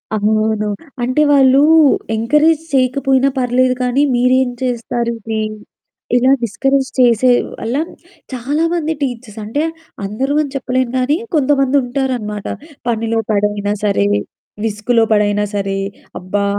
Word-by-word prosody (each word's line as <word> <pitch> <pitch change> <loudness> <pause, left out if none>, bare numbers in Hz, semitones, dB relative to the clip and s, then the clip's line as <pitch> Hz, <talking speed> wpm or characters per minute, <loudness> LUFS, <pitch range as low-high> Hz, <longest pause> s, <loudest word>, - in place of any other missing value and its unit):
అవును. 215 0 +1 0.4
అంటే 255 +5 +1
వాళ్ళూ 270 -1 +5 0.6
ఎంకరేజ్ 300 +7 +2
చేయకపోయినా 265 +1 +2
పర్లేదు 255 +1 +2
కానీ, 250 +3 +1
"మీరేం 255 +1 +3
చేస్తారు 235 -1 -2
ఇది?" 220 0 -3 0.7
ఇలా 255 +2 +4
డిస్కరేజ్ 270 +5 0
చేసే 245 0 +4 0.3
వల్ల 235 +4 -2 0.6
చాలా 275 +6 -1
మంది 320 -2 -1
టీచర్స్, 245 -5 -4
అంటే 225 +8 -2 0.4
అందరూ 255 +8 -2
అని 285 -3 -4
చెప్పలేను 255 -2 -1
గాని 265 +5 +1 0.2
కొంతమంది 275 -1 +2
ఉంటారనమాట. 245 -5 -3 0.4
పనిలో 225 -1 0
పడైనా 205 0 0
సరే, 200 - +2 0.6
విసుగులో 225 +2 +1
పడైనా 210 0 +2
సరే, 195 -1 -1 0.4
అబ్బా! 200 +3 -2
245 Hz, 110 wpm, -16 LUFS, 215-265 Hz, 0.7 s, వాళ్ళూ